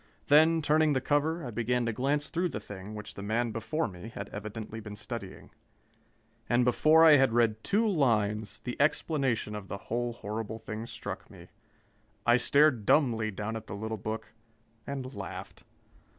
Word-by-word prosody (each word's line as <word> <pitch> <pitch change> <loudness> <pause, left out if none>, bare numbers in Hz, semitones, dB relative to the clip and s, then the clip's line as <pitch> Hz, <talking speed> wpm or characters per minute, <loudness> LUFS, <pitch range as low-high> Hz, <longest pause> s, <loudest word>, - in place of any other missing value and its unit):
Then, 160 +2 +6
turning 155 0 +3
the 130 - +2
cover, 155 +3 0
I 120 - -5
began 120 +2 0
to 115 - -1
glance 140 +5 0
through 175 +1 0
the 105 - -4
thing 100 0 -9
which 105 0 -7
the - - -8
man 115 +3 0
before 115 +9 -2
me 90 +4 -9
had 100 -2 -7
evidently 110 +2 -6
been 105 -1 -8
studying. 105 -2 -7 1.0
And 120 0 +3
before 155 +6 +5
I 155 -2 +9
had 135 -4 +3
read 110 -2 +2
two 220 +3 +2
lines, 110 - +1
the 125 +2 -4
explanation 140 -7 +1
of 105 -2 -6
the 100 - -5
whole 120 +4 -3
horrible 110 0 -5
thing 110 0 -6
struck - - -7
me. - - -14 0.8
I 120 +1 +6
stared 140 -2 +3
dumbly 115 -4 +3
down 110 +2 -4
at 110 -1 -7
the - - -6
little 110 +2 -3
book 110 +1 -5 0.5
and 135 -2 -5
laughed. 95 -4 -8
115 Hz, 170 wpm, -30 LUFS, 110-145 Hz, 1.0 s, I